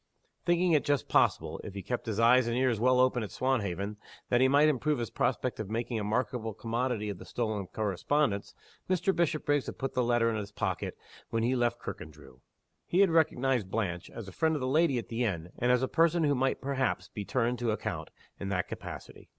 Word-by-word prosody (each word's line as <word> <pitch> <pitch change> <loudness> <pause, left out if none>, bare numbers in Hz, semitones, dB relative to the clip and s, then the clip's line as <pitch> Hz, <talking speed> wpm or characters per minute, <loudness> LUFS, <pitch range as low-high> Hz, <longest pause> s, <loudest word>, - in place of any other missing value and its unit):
Thinking 175 +1 +3
it 150 -3 +4
just 145 -3 0
possible - - +2
if 100 - -8
he 100 - -5
kept 120 +4 -3
his 110 -1 -2
eyes 120 +1 +5
and 120 +1 0
ears 125 -4 +2
well 125 +2 +4
open 125 -1 +3
at 105 - -4
Swanhaven 105 -4 -1 0.3
that 120 0 +3
he 130 - +6
might 145 +3 +5
improve 150 +1 +1
his 120 -3 -4
prospect - - -1
of 105 -3 -4
making 115 +1 -2
a - - -3
marketable 115 0 -1
commodity 115 -2 -2
of 100 - -5
the - - -9
stolen 110 -5 -3
correspondence, 105 +3 -1 0.3
Mr. 185 +1 +1
Bishopriggs 150 -4 +1
had - - -6
put 135 -1 -3
the 125 - +1
letter 120 -1 +2
in 110 - -2
his 105 -1 -5
pocket - - -3 0.3
when 115 0 0
he 125 +3 +2
left 120 -1 +1
Kirkandrew. 75 -4 -9 0.5
He 180 - +3
had 195 -4 +5
recognized 135 - +2
Blanche, 90 -5 -2
as 115 -4 -8
a - - -8
friend 160 - +1
of - - -1
the 130 - -1
lady 150 0 +3
at 120 - -5
the 115 +1 -1
inn 90 -6 -2
and 120 +1 +3
as 125 +1 +3
a - - +2
person 165 +2 +3
who 145 -2 +3
might 135 0 0
perhaps 130 -9 -1
be 105 - -6
turned 120 +2 0
to 120 -1 0
account, 110 - -3 0.3
in 100 - -4
that 90 -2 -1
capacity. - - -9
120 Hz, 215 wpm, -30 LUFS, 105-135 Hz, 0.5 s, he